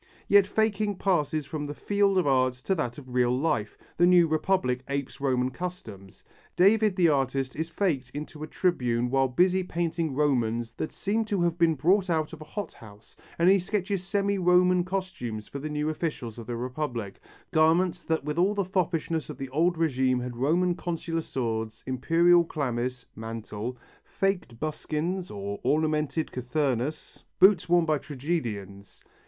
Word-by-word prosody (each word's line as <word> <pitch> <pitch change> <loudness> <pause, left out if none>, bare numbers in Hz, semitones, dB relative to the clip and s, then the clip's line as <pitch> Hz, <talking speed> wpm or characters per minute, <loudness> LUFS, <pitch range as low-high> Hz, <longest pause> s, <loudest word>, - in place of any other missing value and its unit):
Yet 200 -1 +6
faking 210 -1 0
passes 155 -6 0
from 150 +2 -5
the 145 0 -6
field 200 +1 +1
of 185 - +3
art 130 -2 +3
to 125 +10 -2
that 125 -9 -2
of 130 -4 -10
real 125 0 +2
life, 130 -8 -1 0.2
the 175 - +5
new 175 -1 +6
Republic 155 -5 0
apes 140 -1 -4
Roman 130 -2 +1
customs. 115 - -8 0.3
David 210 +2 +4
the 180 -3 +4
artist 135 -3 0
is 160 +1 -3
faked 155 -9 -1
into 150 +1 -7
a 155 - -4
Tribune 125 -9 0
while 135 0 +3
busy 180 +8 +2
painting 165 -4 -2
Romans 120 -5 0
that 155 - -4
seem 215 +3 -1
to 200 -4 0
have 170 -1 +1
been 165 -2 +4
brought 185 +7 +2
out 160 -2 0
of 160 - -9
a - - -8
hot 200 +3 -6
house 105 -1 -15 0.2
and 170 - +3
he 195 +1 +6
sketches 195 0 -2
semi 200 +1 0
Roman 180 0 +4
costumes 185 - -4
for 140 - -7
the 155 +2 -5
new 150 0 -2
officials 150 -8 -3
of 115 - -9
the 120 -1 -3
Republic, 125 -5 -4 0.3
garments 165 +3 +3
that 160 -3 -1
with 150 +3 -2
all 195 +4 +3
the 200 -2 0
foppishness 165 -3 -1
of - - -7
the 135 -1 -6
"old 165 +5 +1
regime" 130 -5 +1
had 125 0 -5
Roman 170 +8 +2
Consular 165 -2 -3
swords, 115 -5 -3
Imperial 165 +7 +4
chlamys 125 -5 -3
(mantle), 115 +1 -6 0.3
faked 180 - -2
buskins 155 +4 -3
or 100 0 -5
ornamented 155 +2 0
cothurnus 130 +2 -2 0.2
(boots 190 -2 +5
worn 175 -1 +4
by 155 -2 +1
tragedians). 120 - -5
155 Hz, 165 wpm, -27 LUFS, 125-180 Hz, 0.3 s, Yet